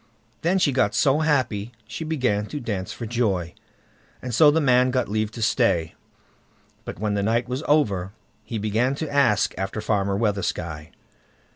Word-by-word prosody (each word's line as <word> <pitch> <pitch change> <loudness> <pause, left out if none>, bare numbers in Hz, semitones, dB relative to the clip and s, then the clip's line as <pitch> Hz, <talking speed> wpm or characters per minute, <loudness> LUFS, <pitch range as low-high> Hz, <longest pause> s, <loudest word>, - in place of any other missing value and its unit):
Then 175 +4 +2
she 165 -6 +3
got 115 -6 +1
so 140 +2 +3
happy 125 -8 0
she 110 +9 -6
began 125 -10 0
to 150 - -5
dance 105 -5 -4
for 115 - -6
joy, 100 -7 -1 0.7
and 125 -1 -6
so 150 +6 +7
the 155 +2 +3
man 130 -3 +4
got 125 -1 0
leave 110 +1 -1
to 115 - -4
stay. 100 -9 +1 0.9
But - - -6
when 105 +2 -1
the 100 - 0
night 115 +4 0
was 125 +3 -3
over, 100 -12 +1 0.3
he 115 - -5
began 110 +6 0
to 150 0 -5
ask 130 -8 +3
after 95 +2 -3
Farmer 100 -2 0
Weathersky. 85 -7 -2
115 Hz, 165 wpm, -24 LUFS, 100-130 Hz, 0.9 s, so